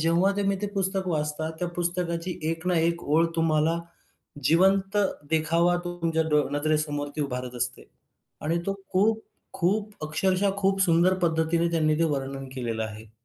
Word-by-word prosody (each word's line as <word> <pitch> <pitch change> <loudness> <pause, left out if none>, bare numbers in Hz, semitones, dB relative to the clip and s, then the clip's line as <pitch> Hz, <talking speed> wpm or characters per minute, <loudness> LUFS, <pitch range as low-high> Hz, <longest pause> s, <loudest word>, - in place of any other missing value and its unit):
जेव्हा 170 +4 +3
तुम्ही 200 -1 +1
ते - - +1
पुस्तक 190 -1 -1
वाचता, 155 -1 -1
त्या 175 0 -1
पुस्तकाची 175 0 -2
एक 165 +1 -5
ना 180 -2 +3
एक 170 +1 +1
ओळ 160 +3 +3
तुम्हाला 160 0 +2 0.7
जिवंत 195 +6 +3 0.3
देखावा 165 +2 +3
तो 175 0 -4
तुमच्या 165 -1 +1
डो 150 -1 +3
नजरेसमोर 150 -1 0
ती 150 - -1
उभारत 125 -2 -4
असते. 125 +1 -3 0.5
आणि 165 +3 0
तो 195 - 0 0.2
खूप, 220 +4 +2 0.3
खूप 205 +4 0
अक्षरशः 190 +5 +1
खूप 195 0 +1
सुंदर 175 +1 +4
पद्धतीने 165 +1 +2
त्यांनी 155 -2 +2
ते 165 - +3
वर्णन 135 0 -5
केलेलं 115 -3 -2
आहे. 110 0 -9
165 Hz, 155 wpm, -26 LUFS, 150-185 Hz, 0.7 s, सुंदर